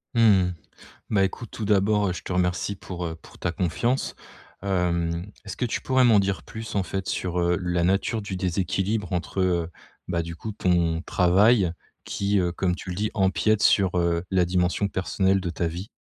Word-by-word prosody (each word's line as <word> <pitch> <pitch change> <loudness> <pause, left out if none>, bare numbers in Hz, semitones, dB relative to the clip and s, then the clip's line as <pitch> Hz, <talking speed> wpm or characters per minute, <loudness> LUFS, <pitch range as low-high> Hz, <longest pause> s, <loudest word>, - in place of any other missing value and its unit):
Mmh, 100 -6 +4 0.6
bah, 100 -3 +3
écoute, 115 +4 -4
tout 110 - -5
d'abord, 105 0 +3
heu, - - 0
je 90 - -7
te - - -9
remercie 90 +2 0
pour, 90 -2 -6
heu, 80 - -4
pour - - -16
ta 85 - -2
confiance. 100 +9 -1 0.5
Hem, 85 -3 0 0.2
est-ce - - -6
que 125 - -1
tu 115 - -2
pourrais 130 -1 +3
m'en 115 -4 +6
dire 95 -4 0
plus, 110 -1 -8
en 100 - +2
fait, 95 +2 -4
sur, 90 -1 -1
heu, 85 0 +2
la 90 -1 0
nature 100 +4 +1
du 100 -2 -5
déséquilibre 95 +3 -1
entre, 90 +2 -2
heu 85 -2 +1 0.4
bah, 85 -2 0
du 85 0 -7
coup 110 +5 -6
ton 85 -4 +1
travail, 95 +2 +4 0.3
qui, 100 0 0
heu, 90 -1 +1
comme 90 0 0
tu 95 - -7
le 90 - -4
dis, 105 +2 -1
empiète 105 +2 +2
sur, 95 -3 +4
heu, 85 0 +1
la 95 -2 +3
dimension 90 +3 +1
personnelle 95 +1 +1
de 90 - -3
ta 85 0 -2
vie? 90 +6 -6
95 Hz, 195 wpm, -25 LUFS, 90-100 Hz, 0.6 s, m'en